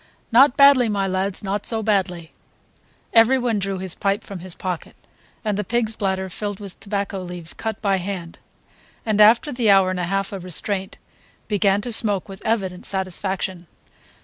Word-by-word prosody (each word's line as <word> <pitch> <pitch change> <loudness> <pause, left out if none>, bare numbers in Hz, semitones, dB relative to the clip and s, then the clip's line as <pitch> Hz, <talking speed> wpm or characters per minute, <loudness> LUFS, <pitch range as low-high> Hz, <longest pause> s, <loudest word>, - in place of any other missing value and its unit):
"Not 250 +3 +6
badly, 280 -4 +6
my 200 -2 0
lads, 190 +1 -2
not 200 +1 -2
so 225 -1 -1
badly." 185 -6 -1 0.8
Everyone 235 -1 +4
drew 195 0 -3
his 185 -2 -5
pipe 200 0 -1
from 195 -2 -8
his 180 0 -5
pocket, 180 -3 -5 0.5
and 210 -2 0
the 210 - -1
pig's 225 +1 -1
bladder 190 -2 -1
filled 205 +2 -5
with 200 -3 -9
tobacco 200 -1 -3
leaves 175 -2 -7
cut 220 -2 -4
by 195 -2 +2
hand, 180 -2 -6 0.7
and, 215 -2 +2
after 235 +8 +6
the 240 -3 +1
hour 195 -2 +5
and 185 - -3
a 180 - -1
half 195 +2 -2
of 190 -3 -6
restraint, 190 +2 -3 0.5
began 200 -1 +2
to 240 +2 -5
smoke 205 -4 +3
with 195 0 -10
evident 190 -5 -1
satisfaction. 190 -1 -2
195 Hz, 170 wpm, -22 LUFS, 185-215 Hz, 0.8 s, Not